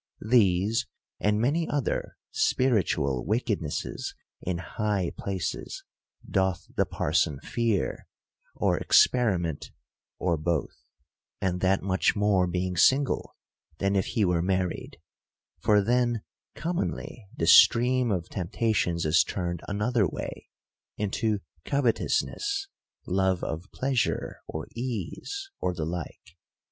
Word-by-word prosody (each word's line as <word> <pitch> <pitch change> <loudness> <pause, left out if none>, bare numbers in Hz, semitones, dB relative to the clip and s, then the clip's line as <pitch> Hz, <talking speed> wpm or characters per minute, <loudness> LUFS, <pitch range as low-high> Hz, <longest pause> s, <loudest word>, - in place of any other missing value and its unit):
These, 105 -2 +3 0.3
and 105 0 +2
many 150 +8 +1
other 145 -3 -2
spiritual 80 - +1
loickednesses 105 -8 -2 0.3
in 90 -1 -2
high 95 0 -1
places 95 -3 -4 0.4
doth 95 -2 0
the - - +2
parson 75 -2 0
fear, 115 -4 -1 0.5
or - - +1
experiment, 90 - +3 0.5
or 85 -3 +1
both: 80 0 -1 0.7
and 90 -1 -1
that 95 0 +2
much 95 -1 +2
more 100 -3 +3
being 90 +1 -1
single, 135 +10 +3 0.4
than 100 +2 +1
if 95 - +1
he 110 - +1
were 90 -2 +2
married; 90 -1 -1 0.6
for 105 +3 +4
then 120 0 +1 0.3
commonly 165 - -3
the - - 0
stream 125 +1 +6
of 90 -4 -1
tempt 90 -3 -5
ations 90 -7 +1
is 80 0 +5
turned 85 -1 -3
another 105 +1 +1
way, - - -6 0.5
into 105 0 0 0.2
covetousness, 395 - 0 0.4
love 95 0 +1
of 80 +4 -4
pleasure 130 -2 -1
or 80 - -5
ease, 125 - -4
or 90 - -1
the 80 -2 -2
like. 85 0 -6
100 Hz, 110 wpm, -27 LUFS, 90-120 Hz, 0.7 s, stream